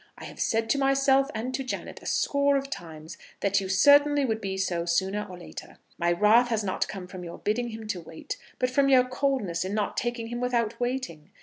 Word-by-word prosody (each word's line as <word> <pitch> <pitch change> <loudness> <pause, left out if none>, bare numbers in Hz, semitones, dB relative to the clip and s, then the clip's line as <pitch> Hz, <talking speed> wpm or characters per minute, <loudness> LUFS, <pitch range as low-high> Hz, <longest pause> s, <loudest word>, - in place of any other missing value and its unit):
I - - -11
have - - -11
said 225 0 +1
to 280 - +2
myself 275 0 +3
and 240 +4 -3
to 270 +1 -2
Janet 255 - -5
a - - -9
score 280 0 +2
of 275 0 -4
times 160 - -8 0.2
that 200 0 +2
you 190 - -5
certainly 285 +8 +5
would 220 -2 -1
be 190 -1 -3
so 175 -3 -1
sooner 190 +4 0
or 180 - -9
later. 175 - -10 0.2
My 170 0 +2
wrath 210 +7 +5
has 225 -3 -1
not 190 -2 -1
come 190 -3 -7
from 180 0 -9
your 170 -1 -8
bidding 235 +3 -1
him 220 -1 -8
to 185 -4 -2
wait, 160 0 -7 0.2
but 250 0 0
from 275 +1 +3
your 260 -2 +6
coldness 255 -9 -1
in 190 +2 -3
not 210 -1 -1
taking 240 -1 -2
him 240 0 -4
without 235 -2 -1
waiting. 245 - -3
225 Hz, 220 wpm, -27 LUFS, 190-260 Hz, 0.2 s, your